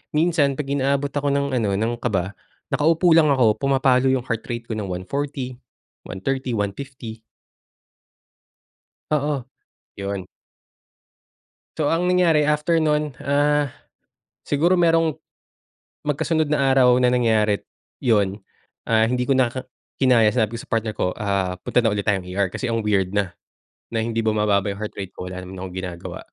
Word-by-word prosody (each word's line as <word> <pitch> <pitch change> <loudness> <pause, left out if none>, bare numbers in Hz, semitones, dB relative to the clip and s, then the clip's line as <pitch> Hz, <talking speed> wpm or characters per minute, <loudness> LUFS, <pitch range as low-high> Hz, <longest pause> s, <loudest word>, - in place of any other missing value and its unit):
minsan 155 -3 +2
pag 150 - -3
inaabot 140 0 0
ako 145 0 -2
ng 140 -2 +1
ano, 100 -3 0
ng 110 +4 0
kaba, 95 -6 -1 0.4
nakaupo 165 +3 +3
lang 160 -1 +6
ako, 125 -7 +3
pumapalo 135 -2 +3
yung 130 -1 +2
heart 115 -3 -4
rate 120 -1 -4
ko 110 - -2
ng 100 - -4
140, 130 +7 -4 0.5
130, 130 +6 -2
150 110 +2 -5 1.9
Oo. 145 -3 0 0.6
Yun. 100 -2 -4 1.5
So 155 0 +1
ang 175 +2 +1
nangyari 175 -4 +4
after 150 +3 +2
non 150 -2 +1
ah, 145 +1 +2 0.8
siguro 170 +6 +2
merong, 165 -2 +3 0.9
magkasunod 155 +2 +1
na 145 -2 +1
araw 130 -2 +5
na 125 - +4
nangyari, 110 -4 +2 0.4
yun, 100 -5 +1 0.5
ah, 110 0 +3
hindi 125 0 0
ko 135 - +2
na 130 -2 +3
ka 130 +2 -6 0.3
kinaya 125 -5 +5
sinabi 110 +1 0
ko - - -7
sa - - -16
partner 115 -1 -1
ko - - -1
ah, 100 -3 -1
punta 125 - +2
na 115 - +2
ulit 105 -1 -2
tayong 100 -3 +1
ER 95 +1 -1
kasi 130 - -3
ang 115 -2 -1
weird 100 -2 +1
na, 95 -4 0 0.5
na 115 -1 -2
hindi 115 0 -2
bumababa 105 -2 +1
yung 100 0 -4
heart 105 - -6
rate 95 -2 -7
ko, 90 0 -6
wala 95 - -6
naman 95 0 -8
akong 95 -1 -7
ginagawa. 90 -2 -6
125 Hz, 155 wpm, -22 LUFS, 105-145 Hz, 1.9 s, lang